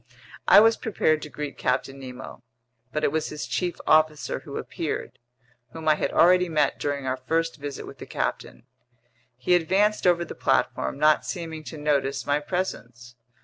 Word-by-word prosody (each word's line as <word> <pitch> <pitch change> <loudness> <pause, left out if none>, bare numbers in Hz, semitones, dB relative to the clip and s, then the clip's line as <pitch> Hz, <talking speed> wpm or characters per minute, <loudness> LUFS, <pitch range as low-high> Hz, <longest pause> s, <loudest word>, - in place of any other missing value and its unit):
I - - +9
was 225 +1 +4
prepared 155 -8 +1
to 150 - -7
greet 150 -1 -6
Captain 135 +1 -1
Nemo, 130 -1 -9 0.5
but 150 +2 -2
it - - +2
was 160 0 -1
his 150 0 -5
chief 175 -2 -2
officer 155 -1 +2
who - - -8
appeared—whom 120 +4 -7
I 155 - +7
had 150 - -1
already 180 +1 +5
met 150 -3 +1
during 140 -2 -2
our 130 0 -1
first 165 +5 -1
visit 145 -2 -6
with - - -12
the - - -9
captain. - - -4 0.7
He 130 +8 +1
advanced 190 +4 +2
over 175 -1 +3
the - - -8
platform, 65 0 0
not 155 0 +4
seeming 165 -4 -5
to 160 - -8
notice 140 -3 0
my 145 +1 +1
presence. 125 -8 -5
150 Hz, 165 wpm, -25 LUFS, 135-165 Hz, 0.7 s, I